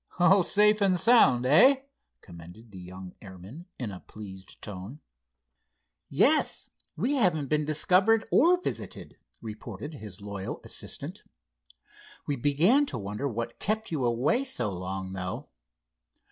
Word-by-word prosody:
"All 185 +2 +5
safe 210 +3 +3
and 185 -3 +3
sound, 135 - +5
eh?" 260 - +6 0.4
commended 90 +6 -13
the 95 - -10
young 90 +1 -10
airman, 100 - -11
in 120 -5 -4
a 95 - -8
pleased 95 -3 -12
tone. 105 +7 -8 1.1
"Yes, - - +2 0.3
we 255 +7 0
haven't 160 - +1
been 150 0 +1
discovered 185 +8 +3
or 350 +5 +5
visited," - - -6 0.2
reported 110 - -7
his 105 -8 -9
loyal 100 -1 -6
assistant. - - -6 1.0
"We 145 - -1
began 165 - +3
to - - -4
wonder 105 +6 -4
what 115 0 -5
kept 220 0 -2
you 150 -5 -1
away 125 - +1
so 120 - -2
long, 95 +1 -5
though." 90 -1 -5
125 Hz, 130 wpm, -28 LUFS, -, 1.1 s, eh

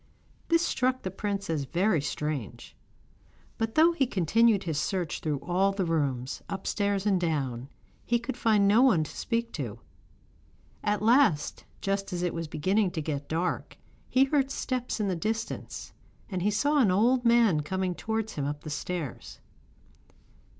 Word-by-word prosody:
This 335 0 +3
struck 255 -5 0
the 185 - -3
prince 200 +1 -3
as 155 -4 -1
very 175 +3 +1
strange; 145 -5 -4 0.8
but 225 0 -1
though 325 +2 +6
he 285 -6 +1
continued 205 - +3
his 160 -4 -1
search 180 -2 -2
through 150 -2 -1
all 185 +3 +2
the 195 -2 -1
rooms, 140 -6 -1
upstairs 200 0 -1
and 195 -3 +2
down, 135 -6 -2 0.3
he 240 - +2
could 235 +2 -5
find 215 -4 +3
no 215 +4 +5
one 230 -12 +5
to 155 - -9
speak 230 0 -2
to. 120 -8 -5 1.1
At 210 0 0
last, 225 - +3 0.2
just 195 0 -1
as 175 0 -2
it 175 - 0
was 165 -1 -4
beginning 190 +7 +1
to 160 - -2
get 145 -2 -4
dark, 170 +3 -2 0.3
he 260 - +4
heard 275 -1 +1
steps 255 -3 -3
in 210 - 0
the 185 - 0
distance 220 +6 -4 0.4
and 185 -2 -2
he 200 - +2
saw 290 +8 +2
an 235 -8 +5
old 240 +7 +3
man 230 -9 +4
coming 185 +4 -2
towards 220 +3 -3
him 145 - -3
up 145 +1 -3
the 155 - -6
stairs. 160 -3 -5
195 Hz, 165 wpm, -28 LUFS, 160-230 Hz, 1.1 s, though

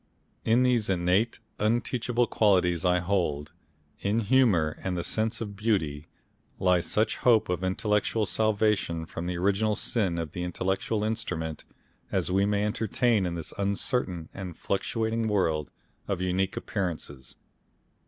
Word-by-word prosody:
In 115 +3 +3
these 120 -5 +2
innate, 95 +5 +1 0.2
unteachable 120 +2 +1
qualities 90 -7 +2
I 90 -1 +3
hold 85 -6 -1 0.5
in 105 +3 0
humour 105 -10 +3
and 90 -1 -2
the 85 - -2
sense 110 +5 +1
of 105 -3 -5
beauty 90 -9 -1 0.5
lies 90 -2 +2
such 110 +1 +1
hope 115 -6 +3
of 90 0 -1
intellectual 105 +3 +1
salvation 105 -6 +1
from 85 +2 -6
the 90 0 -2
original 100 +4 +1
sin 100 -6 0
of 80 -2 -3
our 90 - -3
intellectual 95 +4 -1
instrument 80 -8 -3 0.5
as - - 0
we 100 +2 +3
may 105 0 +1
entertain 110 -1 +1
in 85 - -3
this 85 - -5
uncertain 100 -3 -1
and 90 -3 -7
fluctuating 110 +3 -1
world 80 -8 0 0.4
of 100 -3 -1
unique 95 +1 -1
appearances.... 80 - -4
100 Hz, 135 wpm, -27 LUFS, 90-110 Hz, 0.5 s, In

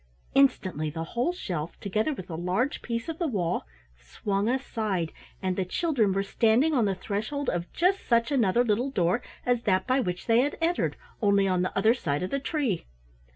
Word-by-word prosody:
Instantly 185 - +2
the 165 +2 -4
whole 240 - -1
shelf, 175 - -5
together 215 +8 0
with 185 -11 -6
a 170 - -7
large 185 - -1
piece 230 -1 -3
of 325 -1 -5
the 340 - +1
wall, 180 - -1 0.3
swung 195 - -2
aside, 215 -9 -1 0.3
and 185 -1 0
the 190 - 0
children 225 - +1
were 195 +1 +1
standing 230 +9 +3
on 245 -6 +3
the 195 -1 0
threshold 215 +9 -2
of 175 0 -3
just 375 +3 +2
such 235 +3 +3
another 240 -3 +3
little 240 +3 +1
door 185 -1 +1 0.2
as 245 -1 +2
that 190 -5 +1
by 255 +1 +2
which 180 -7 -2
they 230 0 +4
had 285 +3 +1
entered, 340 +1 +1 0.3
only 200 -2 +4
on 185 -1 +2
the 185 - -2
other 220 +4 +5
side 155 - -2
of 185 - -3
the 275 - 0
tree. 275 - -1
215 Hz, 195 wpm, -27 LUFS, 185-260 Hz, 0.3 s, other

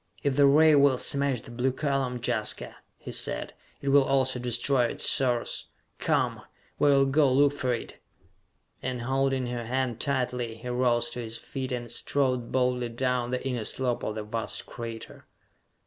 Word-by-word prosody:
"If 140 -2 +1
the 140 0 +6
ray 155 +3 +6
will 140 -2 +5
smash 140 -2 +1
the - - -12
blue 125 +2 0
column, 135 -2 -1
Jaska," - - -1 0.2
he - - -8
said, - - -2 0.3
"it 140 - 0
will 140 0 +6
also 130 -1 +1
destroy 125 +1 +1
its - - 0
source! 125 -3 0 0.3
Come! - - 0 0.4
We 145 - +4
will 135 -1 +5
go 140 0 +3
look 140 +2 +4
for 130 -3 -1
it!" 120 - -5 0.8
And, 125 -2 -3
holding 135 0 0
her 120 -1 -4
hand 125 -2 -1
tightly, 125 -4 -2
he 115 +2 -8
rose 120 -1 +1
to 125 - -5
his 115 -1 -5
feet 130 -2 -5
and 120 -2 -4
strode 130 -4 0
boldly 125 -1 +1
down 125 0 -1
the 125 +1 -2
inner 125 -4 -2
slope 125 +2 0
of 110 - -3
the 110 - -4
vast 110 +2 -3
crater. 115 -1 -8
125 Hz, 170 wpm, -27 LUFS, 120-135 Hz, 0.8 s, the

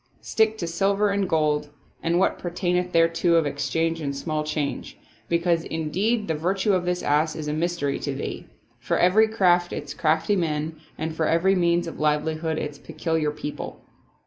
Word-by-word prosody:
Stick 220 0 +1
to 175 - -3
silver 195 +4 +1
and 200 -2 0
gold 150 -2 +1 0.3
and 170 +1 +1
what 190 - +2
pertaineth 180 0 -1
thereto 165 +1 +3
of 165 -2 +4
exchange 160 +4 -1
and 140 -2 -3
small 155 +1 -2
change; 150 -2 -3 0.3
because 170 -1 +2
indeed 190 +9 -1
the 160 - 0
virtue 190 +6 0
of 180 -1 +1
this 180 0 -1
ass 150 +2 +2
is 155 -2 -5
a 150 - -1
mystery 160 -3 -1
to - - -3
thee. - - -5 0.3
For - - -1
every 205 +5 +5
craft 180 -5 +3
its 145 -1 -5
crafty 160 +5 +1
men 160 -3 -1 0.2
and 160 +1 -3
for 160 -1 0
every 175 +4 +3
means 175 -2 +2
of 165 - -7
livelihood 155 +1 0
its 145 -2 -4
peculiar 160 -1 -1
people." 150 0 -6
165 Hz, 170 wpm, -24 LUFS, 155-180 Hz, 0.3 s, every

